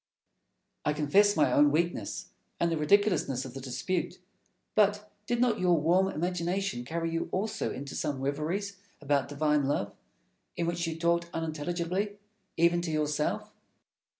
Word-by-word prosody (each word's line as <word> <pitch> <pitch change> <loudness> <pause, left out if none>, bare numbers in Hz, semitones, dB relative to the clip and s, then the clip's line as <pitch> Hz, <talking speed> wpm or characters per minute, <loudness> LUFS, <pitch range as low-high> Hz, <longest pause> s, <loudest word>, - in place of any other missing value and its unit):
Fenelon. 150 - +1
I - - -11
confess 200 +8 +4
my - - +4
own 145 0 +6
weakness, 170 +3 -1 0.3
and 170 0 +2
the 165 - 0
ridiculousness 150 -6 +2
of 130 - -8
the 135 - -7
dispute; 135 +8 -2 0.6
but 210 0 +2 0.2
did 240 0 0
not 235 -3 +2
your 180 -2 +4
warm 175 +5 +3
imagination 180 -4 -1
carry 165 +5 -2
you 165 0 -2
also 205 +4 -1
into 140 +1 -6
some 145 -3 -2
reveries 160 +9 -2 0.2
about 140 -2 +1
divine 150 0 +1
love, 100 -8 -1 0.6
in 170 - 0
which 170 0 -1
you 160 -1 -3
talked 170 0 +1
unintelligibly, 170 +5 -2 0.4
even 170 +1 +4
to 170 - -3
yourself? 150 -1 -1
170 Hz, 150 wpm, -29 LUFS, 150-185 Hz, 0.6 s, own